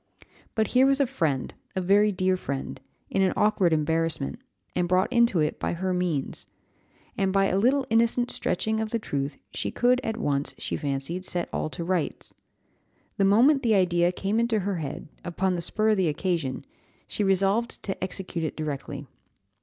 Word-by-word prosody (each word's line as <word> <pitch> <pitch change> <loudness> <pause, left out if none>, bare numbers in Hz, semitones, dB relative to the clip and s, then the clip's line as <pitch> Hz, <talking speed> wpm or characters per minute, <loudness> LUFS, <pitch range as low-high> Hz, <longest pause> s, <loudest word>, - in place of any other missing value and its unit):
But 220 -1 +1
here 260 +1 +5
was 275 0 +3
a 280 - +4
friend, 160 - -1 0.2
a - - +1
very 200 +3 +4
dear 185 -1 +1
friend, 140 -6 -5 0.3
in 195 - +1
an 190 -1 +3
awkward 210 -4 +3
embarrassment, 160 - 0 0.4
and 180 -1 +1
brought 185 +7 +2
into 235 -7 +4
it 150 - -1
by - - -1
her 185 +2 -1
means; 175 -6 -2 0.7
and 195 -1 +2
by 195 0 +3
a 190 - +1
little 260 +5 +3
innocent 235 +2 +2
stretching 220 0 -1
of 220 -1 -2
the 230 - 0
truth 140 -9 -3
she - - -3
could 250 +1 +2
at 225 0 -2
once, 145 -9 -1
she - - -3
fancied, 145 +6 -3
set 175 -2 -2
all - - -1
to 170 +2 -5
rights. 175 -2 -2 0.8
The 195 - +3
moment 250 +9 +5
the 230 -4 +3
idea 175 -2 +3
came 200 +4 -1
into 230 -2 +1
her 195 -1 -1
head, 150 -3 -5 0.2
upon 185 +2 0
the 175 - -2
spur 215 +5 0
of 215 - +3
the 185 -3 +2
occasion, 155 -4 -2 0.4
she 210 - -2
resolved 195 +4 +1
to 195 -2 -4
execute 185 -2 -4
it 160 - -3
directly. 150 -3 -4
190 Hz, 180 wpm, -26 LUFS, 165-220 Hz, 0.8 s, here